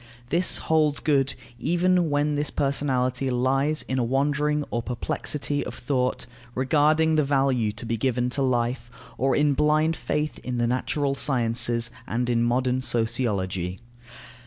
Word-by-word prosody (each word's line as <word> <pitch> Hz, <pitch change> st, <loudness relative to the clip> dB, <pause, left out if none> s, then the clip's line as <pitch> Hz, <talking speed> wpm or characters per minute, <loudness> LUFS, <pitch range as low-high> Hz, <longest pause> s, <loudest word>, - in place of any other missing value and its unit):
This 170 Hz, +4 st, +3 dB
holds 155 Hz, -2 st, +1 dB
good 135 Hz, -3 st, +1 dB, 0.2 s
even 175 Hz, +4 st, +2 dB
when 145 Hz, +1 st, +1 dB
this 145 Hz, 0 st, -1 dB
personality 135 Hz, -2 st, 0 dB
lies 135 Hz, +5 st, +1 dB
in 130 Hz, 0 st, -2 dB
a -, -, +1 dB
wandering 145 Hz, +4 st, 0 dB
or 120 Hz, -, -1 dB
perplexity 140 Hz, +4 st, -2 dB
of -, -, -7 dB
thought 130 Hz, -3 st, -1 dB, 0.3 s
regarding 155 Hz, +4 st, +3 dB
the 155 Hz, -, +4 dB
value 135 Hz, -5 st, +1 dB
to 115 Hz, +2 st, -8 dB
be 115 Hz, 0 st, -2 dB
given 125 Hz, +1 st, 0 dB
to 140 Hz, -, 0 dB
life, 120 Hz, -2 st, 0 dB, 0.3 s
or 135 Hz, +1 st, +1 dB
in 145 Hz, -1 st, +3 dB
blind 155 Hz, +3 st, +2 dB
faith 150 Hz, 0 st, -2 dB
in 125 Hz, -1 st, -4 dB
the 120 Hz, -, +1 dB
natural 130 Hz, +4 st, 0 dB
sciences 120 Hz, -3 st, +1 dB, 0.2 s
and 120 Hz, +1 st, -1 dB
in 115 Hz, -1 st, +2 dB
modern 125 Hz, +2 st, +1 dB
sociology. 100 Hz, -7 st, -1 dB
135 Hz, 145 wpm, -25 LUFS, 120-150 Hz, 0.3 s, the